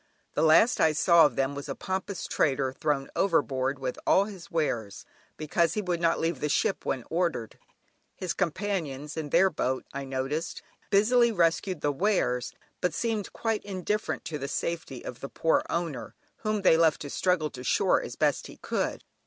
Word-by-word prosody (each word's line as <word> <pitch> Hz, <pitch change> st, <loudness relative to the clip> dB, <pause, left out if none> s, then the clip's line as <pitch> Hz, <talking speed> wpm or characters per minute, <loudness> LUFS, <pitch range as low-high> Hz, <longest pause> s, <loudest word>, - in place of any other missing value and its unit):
The -, -, 0 dB
last 160 Hz, +9 st, +5 dB
I 160 Hz, -1 st, +4 dB
saw 170 Hz, 0 st, +6 dB
of -, -, -9 dB
them 135 Hz, +1 st, 0 dB
was 140 Hz, 0 st, -7 dB
a 135 Hz, -, -3 dB
pompous 190 Hz, 0 st, -4 dB
trader 135 Hz, -2 st, +1 dB
thrown 140 Hz, -1 st, -1 dB
overboard 140 Hz, -7 st, +1 dB
with 130 Hz, -2 st, -4 dB
all 195 Hz, -, +5 dB
his 195 Hz, -5 st, -10 dB
wares, 120 Hz, -11 st, -2 dB, 0.3 s
because 160 Hz, +2 st, +1 dB
he 210 Hz, -, 0 dB
would 175 Hz, -2 st, -1 dB
not 165 Hz, -1 st, +2 dB
leave 165 Hz, -4 st, -1 dB
the 150 Hz, -, -1 dB
ship -, -, 0 dB
when 130 Hz, -3 st, -1 dB
ordered. 165 Hz, -9 st, -1 dB, 0.6 s
His 185 Hz, -2 st, -3 dB
companions 165 Hz, -6 st, -2 dB
in 155 Hz, -2 st, -4 dB
their 185 Hz, +5 st, +4 dB
boat, 130 Hz, +1 st, -1 dB
I 140 Hz, 0 st, -4 dB
noticed, 135 Hz, +5 st, -3 dB, 0.3 s
busily 235 Hz, +4 st, +4 dB
rescued 175 Hz, -2 st, +1 dB
the 145 Hz, -, +1 dB
wares, 140 Hz, -, 0 dB, 0.3 s
but 180 Hz, -, 0 dB
seemed 225 Hz, -4 st, -2 dB
quite 225 Hz, -2 st, -2 dB
indifferent 200 Hz, +1 st, -2 dB
to 160 Hz, -3 st, -4 dB
the 140 Hz, -, -4 dB
safety 145 Hz, -3 st, -4 dB
of 125 Hz, -, -7 dB
the 140 Hz, -, -6 dB
poor 165 Hz, -, +2 dB
owner, 170 Hz, -5 st, -3 dB, 0.2 s
whom 215 Hz, -2 st, -2 dB
they 160 Hz, -, +6 dB
left 165 Hz, -2 st, +3 dB
to 145 Hz, -, -5 dB
struggle 180 Hz, -5 st, +1 dB
to 125 Hz, -, -9 dB
shore -, -, +3 dB
as -, -, -7 dB
best -, -, +1 dB
he -, -, -12 dB
could. -, -, -2 dB
165 Hz, 180 wpm, -28 LUFS, 140-185 Hz, 0.6 s, saw